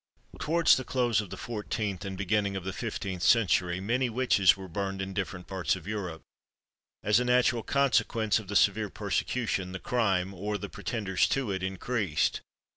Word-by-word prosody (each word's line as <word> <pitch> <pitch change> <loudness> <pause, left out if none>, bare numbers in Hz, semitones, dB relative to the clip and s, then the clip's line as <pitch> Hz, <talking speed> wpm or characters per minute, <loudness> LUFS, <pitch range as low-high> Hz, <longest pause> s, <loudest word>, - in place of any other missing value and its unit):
Towards 170 +2 +4
the 130 - -3
close 120 -5 +1
of 100 - -9
the - - -7
fourteenth 105 -4 -3
and 95 -1 -5
beginning 100 +1 0
of 95 - -4
the 95 0 -4
fifteenth 95 -5 -4
century, 90 -3 +3
many 120 +6 0
witches 105 -7 +4
were 95 -1 -8
burned 95 +2 -3
in 95 0 -4
different 95 -2 -4
parts 95 -5 -1
of 90 -3 -10
Europe. 95 -6 -4 0.8
As 105 +2 +4
a - - +1
natural 125 -1 +3
consequence 115 -5 +2
of 105 - -11
the 100 - -5
severe - - +3
persecution, 95 -7 -2
the 95 - -5
crime, 95 -6 0
or 105 +3 -3
the 100 -1 -6
pretenders 100 -5 -1
to 135 -6 0
it, 95 -1 -2
increased. 95 -2 -1
100 Hz, 175 wpm, -29 LUFS, 95-115 Hz, 0.8 s, Towards